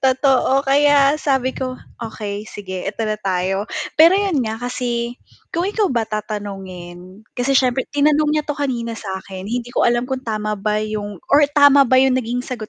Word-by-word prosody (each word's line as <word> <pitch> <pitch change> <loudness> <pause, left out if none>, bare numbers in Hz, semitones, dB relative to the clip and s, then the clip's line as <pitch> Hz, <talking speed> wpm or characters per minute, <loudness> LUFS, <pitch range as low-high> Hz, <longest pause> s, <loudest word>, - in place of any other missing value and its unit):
totoo, 265 0 +3
kaya 285 +1 +4
sabi 265 -2 0
ko, 255 -1 -3 0.3
"Okey 210 -2 -5
sige, 190 -2 -7
eto 215 +3 -3
na 215 - -1
tayo," 190 +1 -1 0.3
pero 330 +3 +7
yun 390 -8 +1
nga, 220 0 -3
kasi 245 -1 -3 0.4
kung 340 +2 0
ikaw 415 -1 +1
ba 235 -2 +1
tatanungin, 195 -3 -7
kasi 250 +2 0
siyempre 255 0 +2
tinanong 295 +1 +3
niya 305 -1 0
to 295 - -2
kanina 240 -5 -2
sa 215 - -8
akin, 190 -1 -9
hindi 245 +1 -3
ko - - +1
alam 240 0 +1
kung 265 -1 -2
tama 215 -1 -2
ba 210 +1 -1
yung 210 -1 -5 0.2
or 290 +1 +7
tama 285 -1 +7
ba 260 - +4
yung 265 -1 +3
naging 245 0 -2
sagot 235 -5 -6
240 Hz, 180 wpm, -19 LUFS, 210-275 Hz, 0.4 s, pero